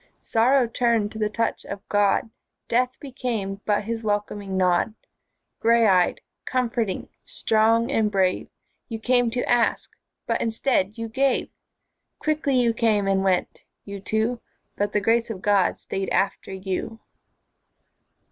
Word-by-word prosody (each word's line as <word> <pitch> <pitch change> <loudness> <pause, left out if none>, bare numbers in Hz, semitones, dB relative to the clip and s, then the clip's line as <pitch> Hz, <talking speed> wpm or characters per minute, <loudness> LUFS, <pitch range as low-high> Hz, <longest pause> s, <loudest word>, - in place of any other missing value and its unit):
Sorrow 250 +3 +3
turned 230 -2 +1
to 220 - -8
the 210 -1 +1
touch 230 +2 -1
of 200 0 -8
God, 205 +2 +2 0.4
Death 250 +2 0
became 230 -8 -4
but 210 0 +1
His 225 +1 -3
welcoming 205 -2 -2
nod. 185 +3 +2 0.6
Grey 230 0 +4
eyed, 185 -4 +3 0.2
comforting, 235 -5 -1 0.2
strong 225 +3 +2
and 220 -5 +2
brave, 190 -2 +1 0.4
You 225 - -3
came 245 +1 +2
to 245 +2 -2
ask 240 -1 +1 0.3
but - - -1
instead 225 -2 0
you 230 0 -4 1.1
Quickly 305 -3 0
you 240 -2 +3
came 220 -3 +2
and 195 0 +2
went, 185 -2 0 0.2
you 200 0 -7
two, 220 +4 -1 0.3
But 205 0 -1
the 210 - +1
Grace 230 +3 +2
of 215 -4 -5
God 205 -2 +3
stayed 195 0 -4
after 195 0 -1
you. 190 +4 -4
220 Hz, 135 wpm, -24 LUFS, 200-235 Hz, 1.1 s, Grey